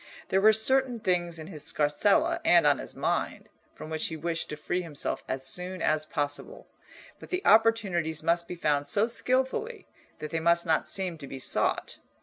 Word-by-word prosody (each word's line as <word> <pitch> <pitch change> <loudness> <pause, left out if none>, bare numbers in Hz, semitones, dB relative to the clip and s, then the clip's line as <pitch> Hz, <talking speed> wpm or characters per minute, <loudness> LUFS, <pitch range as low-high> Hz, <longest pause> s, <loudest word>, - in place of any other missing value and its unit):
There 190 - +2
were 215 +2 +7
certain 250 +2 +2
things 175 -4 -1
in 160 - -8
his 155 -4 -8
scarsella 145 -1 +1
and - - +5
on - - +3
his - - -8
mind, - - -2 0.3
from 155 - -10
which 155 0 -1
he 160 - -6
wished 165 +1 -3
to 150 - -4
free 175 +4 -2
himself 160 -5 -4
as 130 0 -1
soon 180 +7 -2
as 155 -1 0
possible, 145 - -2 0.5
but - - -12
the 365 +2 -3
opportunities 195 -9 +2
must 170 +1 +1
be 180 - -6
found 145 -4 0
so 205 +8 +4
skilfully 260 - -1 0.3
that 155 - -7
they 165 - -1
must 170 +1 +2
not 160 -2 0
seem 185 -4 -2
to 140 - -9
be 135 - -8
sought. 130 - 0
170 Hz, 185 wpm, -27 LUFS, 155-210 Hz, 0.5 s, were